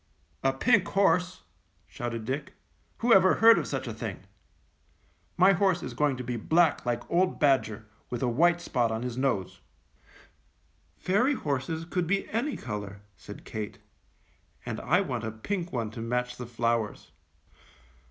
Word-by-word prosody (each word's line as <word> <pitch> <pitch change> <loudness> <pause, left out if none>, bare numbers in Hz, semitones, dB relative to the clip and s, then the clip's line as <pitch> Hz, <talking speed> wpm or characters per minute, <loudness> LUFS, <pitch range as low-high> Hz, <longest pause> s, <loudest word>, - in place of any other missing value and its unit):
"A 135 - +3
pink 205 - +3
horse," 185 -2 +1 0.4
shouted 115 -2 -5
Dick, 140 +4 -4 0.5
"who 240 - +6
ever 185 -1 +6
heard 225 0 +7
of - - -4
such - - -3
a - - -4
thing? - - -6 1.2
My 185 +2 +6
horse 185 -1 +1
is - - -5
going 145 -3 +1
to 125 - -5
be 120 0 -3
black 160 +7 +2
like 120 0 -2
old 180 +2 +1
Badger, 125 -7 +2 0.2
with 120 +1 -3
a - - +2
white 170 +8 +3
spot 120 -8 0
on 110 +2 -3
his 125 -2 -4
nose." 125 -8 -1 1.4
"Fairy 240 +10 +2
horses 150 - -3
could 175 0 -2
be 195 +3 0
any 245 +7 -1
color," 105 -3 -6
said - - -12
Kate, 105 -2 -6 0.9
"and - - -4
I 180 +5 +2
want 125 - -3
a 110 - -2
pink 175 - -4
one 115 -4 -3
to 115 - -7
match 125 +1 -2
the 125 - -7
flowers." 115 -6 -2
135 Hz, 155 wpm, -28 LUFS, 115-180 Hz, 1.4 s, heard